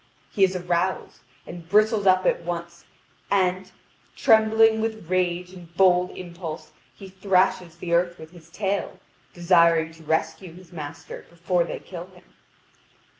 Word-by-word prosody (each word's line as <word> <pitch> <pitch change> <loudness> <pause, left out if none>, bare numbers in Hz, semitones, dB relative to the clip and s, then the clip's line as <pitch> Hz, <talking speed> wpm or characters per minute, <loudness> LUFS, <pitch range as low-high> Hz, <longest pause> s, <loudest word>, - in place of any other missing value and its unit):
He 195 - +1
is 190 0 +3
aroused, 180 +1 -2 0.3
and 170 -1 -10
bristles 215 0 +3
up 185 0 +4
at - - +1
once, 170 0 -6 0.4
and, 185 -1 0 0.4
trembling 220 -1 +4
with 220 -6 -4
rage 180 0 -1
and 175 -3 -13
bold 180 -1 +4
impulse, 170 -3 -8 0.2
he 195 - -11
thrashes 185 -3 0
the 170 0 -4
earth 175 0 +1
with 160 0 -12
his 170 -2 -17
tail, 200 +3 -3 0.3
desiring 170 -2 +3
to 165 0 -17
rescue 160 +3 -2
his 180 0 -16
master 150 -3 -9
before 170 +1 -1
they - - -5
kill 175 -1 -9
him. 185 -1 -19
180 Hz, 140 wpm, -24 LUFS, 170-190 Hz, 0.4 s, up